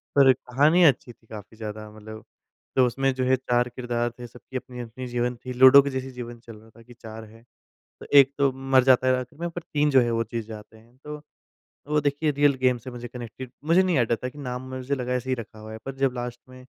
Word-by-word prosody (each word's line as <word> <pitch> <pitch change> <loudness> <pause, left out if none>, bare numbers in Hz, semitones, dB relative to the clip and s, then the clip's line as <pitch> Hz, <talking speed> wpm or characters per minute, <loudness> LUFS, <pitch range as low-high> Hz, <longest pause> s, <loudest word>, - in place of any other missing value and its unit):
पर 135 -2 +7
कहानी 145 +8 +2
अच्छी 130 -5 +3
थी 115 - -32
काफ़ी 110 0 -11
ज़्यादा 110 -1 -7
मतलब। 110 0 -11 0.5
तो 130 -1 +5
उसमें 135 +2 0
जो 130 0 -2
है 130 - +4
4 125 -1 0
किरदार 120 -1 -2
थे, 120 - -7
सबकी 125 +2 -9
अपनी, 125 -1 -9
अपनी 120 +2 -7
जीवन 120 0 -1
थी। 125 +2 -8
लूडो 130 +2 +8
के 140 - -3
जैसी 130 -1 -5
जीवन 120 -1 -8
चल 115 -1 -12
रहा 110 +1 -18
था 115 +1 -19
कि 120 +1 -15
4 110 -1 -10
है, 115 +1 -18 0.6
तो - - -10
एक 135 0 +6
तो 140 -1 +3
मर 135 0 +2
जाता 130 -1 +4
है 130 - +4
आखिर 130 +4 -11
में, 170 - -2
पर 175 +1 -7
3 150 0 +2
जो 135 -2 +6
हैं 120 - +1
तो 115 - 0
वो 115 - 0
जीत 115 -2 -3
जाते 110 0 -11
हैं। 115 +3 -22
तो 150 0 -7 0.7
वो 150 0 +2
देखिए 145 +2 0
रियल 145 0 +3
गेम 125 -1 +3
से 125 +2 -10
मुझे 120 0 -7
कनेक्टेड 125 +1 -9
मुझे 175 +4 +4
नहीं 180 -5 +1
आइडिया 120 -1 +2
था 125 - -2
कि 145 - -17
नाम 125 -3 -5
मुझे 130 +2 -2
लगा 125 -1 -3
ऐसे 125 +1 -3
ही 130 - +1
रखा 110 -1 -10
हुआ 110 0 -10
है 110 - -7
पर 135 - -6
जब 135 -1 0
लास्ट 120 0 -5
में 130 0 -14
125 Hz, 255 wpm, -25 LUFS, 115-135 Hz, 0.7 s, लूडो